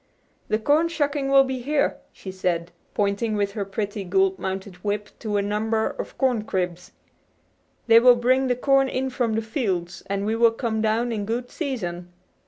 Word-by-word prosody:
"The 215 Hz, -, +1 dB
corn 295 Hz, +9 st, +3 dB
shucking 290 Hz, -4 st, -1 dB
will 275 Hz, 0 st, +7 dB
be 260 Hz, -1 st, -3 dB
here," 285 Hz, +4 st, 0 dB
she 190 Hz, -, -9 dB
said, 180 Hz, -2 st, -2 dB, 0.2 s
pointing 205 Hz, +2 st, 0 dB
with 200 Hz, -1 st, 0 dB
her 200 Hz, 0 st, -3 dB
pretty 205 Hz, +1 st, -4 dB
gold 190 Hz, +1 st, +1 dB
mounted 190 Hz, 0 st, -5 dB
whip 205 Hz, +2 st, -3 dB
to 210 Hz, -3 st, -2 dB
a 200 Hz, -, +1 dB
number 220 Hz, +2 st, 0 dB
of -, -, -7 dB
corn 250 Hz, -5 st, +1 dB
cribs. 180 Hz, -4 st, -3 dB, 0.9 s
"They 230 Hz, -1 st, +7 dB
will 245 Hz, +1 st, +7 dB
bring 255 Hz, +2 st, +2 dB
the 250 Hz, -, +2 dB
corn 270 Hz, +1 st, +3 dB
in 260 Hz, +1 st, -2 dB
from 240 Hz, -3 st, 0 dB
the 225 Hz, +1 st, -1 dB
fields, 195 Hz, -, -2 dB
and 200 Hz, 0 st, -2 dB
we 220 Hz, +1 st, 0 dB
will 230 Hz, 0 st, +4 dB
come 225 Hz, -2 st, -2 dB
down 225 Hz, +2 st, +1 dB
in 215 Hz, -3 st, -2 dB
good 240 Hz, +2 st, -3 dB
season." 180 Hz, -, -4 dB
220 Hz, 185 wpm, -24 LUFS, 200-250 Hz, 0.9 s, will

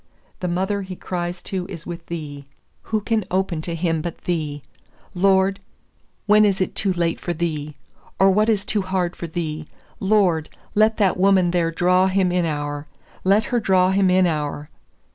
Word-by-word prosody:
The 180 Hz, -, -2 dB
mother 190 Hz, +3 st, -1 dB
he 185 Hz, -1 st, -7 dB
cries 175 Hz, 0 st, -4 dB
to 185 Hz, -2 st, -4 dB
is 165 Hz, -4 st, -8 dB
with 170 Hz, -1 st, -7 dB
Thee. 145 Hz, -4 st, -6 dB, 0.4 s
Who 215 Hz, -1 st, -1 dB
can 220 Hz, 0 st, 0 dB
open 185 Hz, -3 st, -1 dB
to 170 Hz, +1 st, -3 dB
him 165 Hz, -1 st, 0 dB
but 170 Hz, +1 st, -5 dB
Thee? 150 Hz, -5 st, -2 dB, 0.5 s
Lord, 190 Hz, +1 st, +3 dB, 0.7 s
when 210 Hz, 0 st, +6 dB
is 200 Hz, -2 st, +2 dB
it 185 Hz, -, -1 dB
too 195 Hz, -, 0 dB
late 170 Hz, -2 st, -1 dB
for 175 Hz, -, -3 dB
Thee, 155 Hz, -3 st, -3 dB, 0.4 s
or 195 Hz, 0 st, +5 dB
what 210 Hz, +3 st, +3 dB
is 205 Hz, -3 st, +1 dB
too 210 Hz, -1 st, 0 dB
hard 185 Hz, -2 st, -1 dB
for 170 Hz, -, -6 dB
Thee? 160 Hz, -2 st, -4 dB, 0.3 s
Lord, 190 Hz, -6 st, +2 dB, 0.2 s
let 215 Hz, +1 st, +3 dB
that 195 Hz, -4 st, +2 dB
woman 185 Hz, -2 st, +4 dB
there 170 Hz, -2 st, +1 dB
draw 180 Hz, +3 st, +3 dB
him 190 Hz, -1 st, +2 dB
inower! 145 Hz, -4 st, -2 dB, 0.4 s
Let 200 Hz, +3 st, +4 dB
her 240 Hz, -, +4 dB
draw 185 Hz, -3 st, +3 dB
him 195 Hz, 0 st, +3 dB
inower!" 155 Hz, -5 st, +1 dB
180 Hz, 170 wpm, -22 LUFS, 165-195 Hz, 0.7 s, when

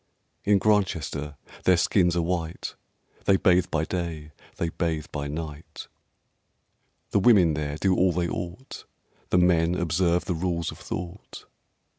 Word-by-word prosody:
In 105 Hz, 0 st, +5 dB
Grantchester 85 Hz, -8 st, 0 dB, 0.3 s
their 90 Hz, -1 st, +5 dB
skins 90 Hz, 0 st, +2 dB
are 85 Hz, -, +1 dB
white; 85 Hz, -1 st, -3 dB, 0.5 s
They 95 Hz, -, +5 dB
bathe 90 Hz, -2 st, +3 dB
by 80 Hz, 0 st, 0 dB
day, 80 Hz, -4 st, -4 dB, 0.3 s
they 85 Hz, -, -1 dB
bathe 80 Hz, -2 st, -2 dB
by 70 Hz, -1 st, -3 dB
night; 75 Hz, 0 st, -7 dB, 1.2 s
The -, -, +3 dB
women 95 Hz, -6 st, +5 dB
there 75 Hz, 0 st, -3 dB
do 95 Hz, +2 st, +2 dB
all 90 Hz, 0 st, +3 dB
they 85 Hz, 0 st, -1 dB
ought; 90 Hz, +11 st, -6 dB, 0.4 s
The -, -, +3 dB
men 90 Hz, -1 st, +3 dB
observe 85 Hz, 0 st, +1 dB
the 90 Hz, -, -1 dB
Rules 85 Hz, -1 st, -2 dB
of -, -, -12 dB
Thought. 90 Hz, +3 st, -7 dB
85 Hz, 140 wpm, -26 LUFS, 80-90 Hz, 1.2 s, In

